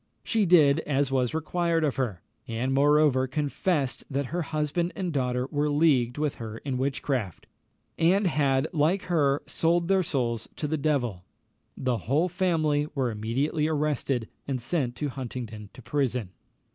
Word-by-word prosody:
She 220 -4 +1
did 155 -4 +6
as 140 -3 0
was 130 0 +1
required 165 +1 0
of 145 -3 0
her; 110 -10 -2 0.2
and 120 +4 -1
moreover 145 -1 +4
confessed 140 -1 -1
that 140 +1 -1
her 175 - 0
husband 155 +3 -1
and 185 -5 -3
daughter 125 -2 0
were 150 0 +1
leagued 145 -5 +3
with 150 -2 -1
her 110 -1 -6
in 130 0 -3
witchcraft, 130 - -2 0.5
and 185 +5 +4
had, 140 -4 +2
like 165 +5 +2
her, 145 -5 +1
sold 170 +1 +1
their 190 -1 +4
souls 120 - -2
to 150 - -3
the 155 - 0
devil. 130 -11 -1 0.5
The 125 -3 0
whole 155 +7 +3
family 160 -5 +1
were 130 -4 0
immediately 135 +9 -1
arrested, 145 -6 -1 0.2
and 135 -2 -1
sent 125 -1 -1
to 145 +3 -2
Huntingdon 120 -5 -6
to 130 - -12
prison. 125 -5 -1
140 Hz, 155 wpm, -27 LUFS, 125-155 Hz, 0.5 s, did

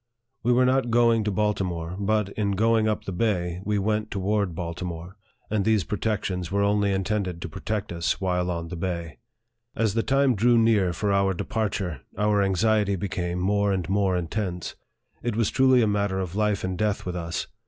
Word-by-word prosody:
We 120 - +1
were 125 +1 +4
not 130 -1 +2
going 115 -1 +4
to 105 - 0
Baltimore; 90 -5 -1
but, 105 0 +1
in 100 -1 -1
going 110 +2 +3
up 110 - -1
the - - -5
bay, 90 -3 -1
we 105 0 +1
went 105 +1 0
toward 100 -2 -1
Baltimore, 85 +1 -5 0.4
and 105 -2 +1
these 110 -2 +2
protections 95 -3 -2
were 100 +1 +2
only 100 0 +2
intended 95 -2 -1
to 85 - -5
protect 105 +5 -4
us 85 -1 -1
while 90 -2 0
on 85 -1 -3
the 90 - -5
bay. 85 -3 -4 0.6
As 110 -3 +1
the 115 - +1
time 135 +1 +3
drew 120 +3 +3
near 110 -5 +3
for 100 +4 -1
our 100 -1 +2
departure, 95 -7 -2 0.2
our 105 0 +2
anxiety 100 +1 +2
became 90 -2 -3
more 100 +2 +1
and 90 -4 -1
more 95 -2 +2
intense. 90 0 -3 0.5
It 120 -2 -2
was 115 -2 +1
truly 130 -2 +4
a - - +2
matter 100 -2 0
of 90 -1 -4
life 105 -1 +1
and 95 0 -2
death 105 -1 0
with 90 -1 -3
us. 85 -1 -3
100 Hz, 185 wpm, -25 LUFS, 90-110 Hz, 0.6 s, were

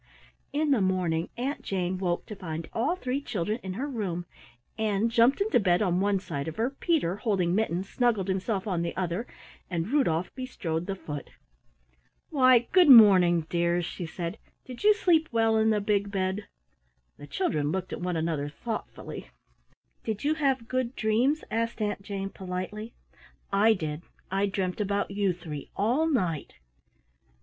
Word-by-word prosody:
In 300 0 +1
the 255 -7 +3
morning 180 -3 0
Aunt 265 +4 -2
Jane 185 -1 -2
woke 175 -2 -1
to 210 - -8
find 165 -3 -5
all 255 +10 +1
three 270 -5 -2
children 210 -2 -2
in 190 -1 -5
her 260 +9 -3
room. 195 -10 -3 0.5
Ann 215 0 +1
jumped 235 +4 +4
into 410 - +3
bed 180 -1 +3
on 180 -2 +1
one 200 +1 +2
side 165 -6 -5
of 160 - -5
her, 235 +4 0
Peter, 275 - 0
holding 190 -6 0
Mittens, 190 -3 0
snuggled 230 -6 +1
himself 190 +1 -1
on 180 -5 -1
the 170 0 -3
other, 185 +5 -2 0.4
and 170 +1 -2
Rudolf 185 - +1
bestrode 175 -11 -4
the 195 - -2
foot. 145 -6 -7 1.0
"Why, 255 -5 +5
good 365 -5 +6
morning, 190 -8 +8
dears," 170 +2 0
she 175 0 -5
said. 170 +5 -5 0.3
"Did 250 -2 -9
you 425 0 +6
sleep 330 -6 +3
well 225 -1 +3
in 220 0 +3
the 215 -1 +2
big 205 0 0
bed?" 190 +1 -2 0.7
The 145 - -11
children 150 - -1
looked 185 0 -3
at - - -5
one 180 -1 -1
another 160 -3 -1
thoughtfully. 220 +8 -6 0.8
"Did 215 -2 -3
you 300 +2 +2
have 270 -6 0
good 255 -1 -1
dreams?" 240 +8 +1
asked 230 +1 -1
Aunt 205 -2 -1
Jane 195 -1 -5
politely. 190 +4 -6 0.6
"I 215 +3 +5
did, 155 -3 -4 0.3
I 195 +1 +1
dreamt 190 0 -2
about 200 0 -1
you 200 -1 +1
three 160 -5 -7
all 245 +11 +2
night." 180 - -1
200 Hz, 165 wpm, -28 LUFS, 175-235 Hz, 1.0 s, morning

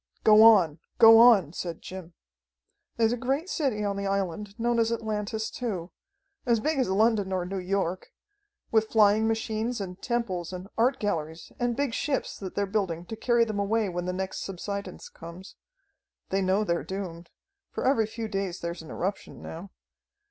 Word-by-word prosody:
"Go 215 0 +7
on! 190 -9 +6 0.2
Go 225 -1 +9
on!" 210 -10 +6
said 170 -2 -5
Jim. 180 -2 -9 0.8
"There's 230 0 +3
a - - -2
great 275 +8 -2
city 265 - -1
on 200 -1 -1
the 200 0 -2
island, 200 +2 -3
known 235 0 +1
as 225 0 +2
Atlantis 220 -1 -3
too. 190 -8 -4 0.5
As 235 -3 +2
big 305 +5 0
as 255 - +1
London 205 0 +2
or 185 -2 -1
New 190 +1 -4
York. 185 -1 -2 0.6
With 220 -1 +3
flying 215 0 +4
machines 225 +1 -2
and 185 -2 -7
temples 190 -8 -2
and 180 +1 -7
art 255 +4 +2
galleries 160 -5 -3
and 240 -1 0
big 280 -4 -1
ships 275 +2 -2
that 190 -2 -7
they're 200 - +1
building 190 -5 -2
to 225 - -6
carry 235 +1 +2
them 215 -2 -3
away 210 +1 +1
when 175 0 -4
the 180 - -1
next 190 +1 -4
subsidence 200 0 -6
comes. 170 +3 -11 0.7
They 195 +1 0
know 190 +3 +2
they're 170 -4 -1
doomed, 180 -3 -6 0.4
for - - -4
every 225 -5 +3
few 225 0 -5
days 195 -3 -3
there's 170 0 -5
an 160 - -12
eruption 195 +3 -4
now. 170 +5 -8
200 Hz, 175 wpm, -27 LUFS, 185-225 Hz, 0.8 s, Go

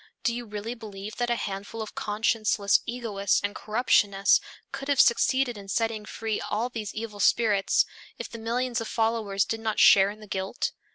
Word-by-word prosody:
Do 235 - +1
you 240 0 -5
really 210 +2 -5
believe 210 -3 -9
that 240 0 -1
a 240 - +2
handful 200 +1 -5
of 215 -1 -5
conscienceless 210 -1 +1
egoists 215 -5 0
and 205 0 -1
corruptionists 205 -3 +3 0.3
could 275 - -6
have 285 -2 +1
succeeded 245 -1 +3
in 200 - -11
setting 220 +1 -1
free 220 0 -3
all 225 +4 -2
these 220 -4 -6
evil 215 -2 -6
spirits, 205 -1 +3 0.3
if - - -5
the 230 - -9
millions 240 +1 -1
of 225 - -4
followers 220 -4 0
did 225 - -3
not 220 -1 -2
share 195 0 +7
in 210 +1 -9
the 215 - -11
guilt? 190 +3 -3
220 Hz, 180 wpm, -27 LUFS, 205-235 Hz, 0.3 s, share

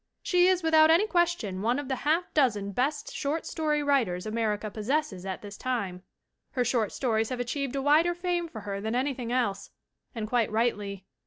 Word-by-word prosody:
She 360 -1 +4
is 370 -2 +2
without 315 -1 +6
any 335 +6 +5
question 345 - 0
one 235 +4 +1
of 290 -2 -4
the 265 -1 -1
half 320 +6 0
dozen 210 -9 +2
best 280 +7 -1
short 300 +3 -2
story 300 -2 0
writers 240 -11 +1
America 215 -1 -1
possesses 215 -4 -2
at 190 +1 -5
this 205 -1 -8
time. 200 -8 -3 0.5
Her 250 -2 +1
short 235 -4 +1
stories 225 -4 0
have 255 -1 -3
achieved 270 +2 -2
a 270 - -1
wider 320 +5 +4
fame 350 -1 -1
for 225 -9 -9
her 200 -1 -4
than 220 +3 -2
anything 255 -2 -1
else, 240 -6 -1 0.5
and 220 -2 -3
quite 235 -1 +1
rightly. 205 -4 -1
250 Hz, 185 wpm, -28 LUFS, 215-300 Hz, 0.5 s, without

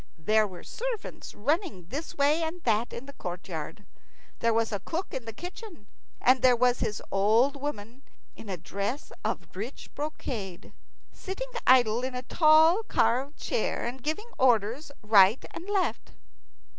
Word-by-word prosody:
There 215 +6 +3
were 180 -3 -11
servants 480 -3 -5
running 290 - -1
this 295 +8 -5
way 295 +3 +3
and 330 +2 -4
that 225 0 +1
in 240 - -7
the 280 - -11
courtyard. 175 - -6 0.5
There 230 - +2
was 225 0 +1
a 205 - -1
cook 335 - -4
in 255 - -4
the 225 - -5
kitchen, 355 - -9 0.3
and 255 +1 +4
there 255 -1 +6
was 245 0 +2
his 210 - -2
old 220 +8 +3
woman, 260 -3 -6 0.3
in 215 - -11
a 185 - -3
dress 200 - -4
of - - -4
rich 220 +8 -7
brocade, 230 - -5 0.4
sitting - - -6 0.2
idle 245 -2 +5
in 260 0 -3
a 250 - -4
tall 315 - +5
carved 265 - +1
chair, - - -1
and 250 +2 -5
giving 315 - -3
orders 245 +4 +2
right 210 +1 +6
and 355 +4 -8
left. 395 -2 -1
250 Hz, 155 wpm, -28 LUFS, 210-310 Hz, 0.5 s, there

